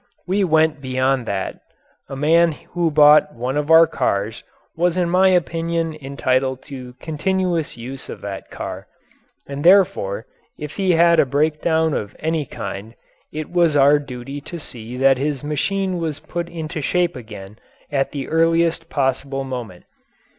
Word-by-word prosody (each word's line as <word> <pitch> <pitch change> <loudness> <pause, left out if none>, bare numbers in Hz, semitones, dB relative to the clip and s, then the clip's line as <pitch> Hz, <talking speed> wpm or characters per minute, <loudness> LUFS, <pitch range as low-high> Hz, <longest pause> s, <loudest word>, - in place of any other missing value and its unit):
We 195 +2 +1
went 160 -3 +2
beyond 130 -1 0
that. 95 -1 -3 0.5
A 135 - -5
man 165 +4 +3 0.2
who 170 -1 +1
bought 150 0 +5
one 125 +3 -3
of 150 +1 -1
our 165 +1 +8
cars 110 -8 -2 0.3
was 175 +1 +1
in 175 -2 +1
my 185 +1 +5
opinion 165 -2 0
entitled 130 -1 -1
to 130 -3 -9
continuous 170 -1 -1
use 125 +3 -8
of - - -7
that 100 -1 -7
car, - - -7 0.6
and 140 +1 -6
therefore 170 - +3 0.3
if 150 0 -7
he 190 -3 +2
had 170 0 +5
a - - +5
breakdown 155 +3 +1
of 105 -5 -4
any 160 -3 -2
kind 110 +2 -7 0.4
it 155 0 -6
was 170 -4 +3
our 145 +1 +5
duty 135 0 -7
to 170 +4 -8
see 120 -4 -8
that 135 0 +4
his 145 -1 -2
machine 185 +5 -1
was 160 -3 -3
put 170 0 -5
into 160 -2 -5
shape 175 +3 0
again 105 -4 -10 0.3
at 135 -1 0
the 140 -2 -5
earliest 165 +1 +1
possible 135 0 -1
moment. 125 -9 -7
150 Hz, 155 wpm, -20 LUFS, 130-165 Hz, 0.6 s, our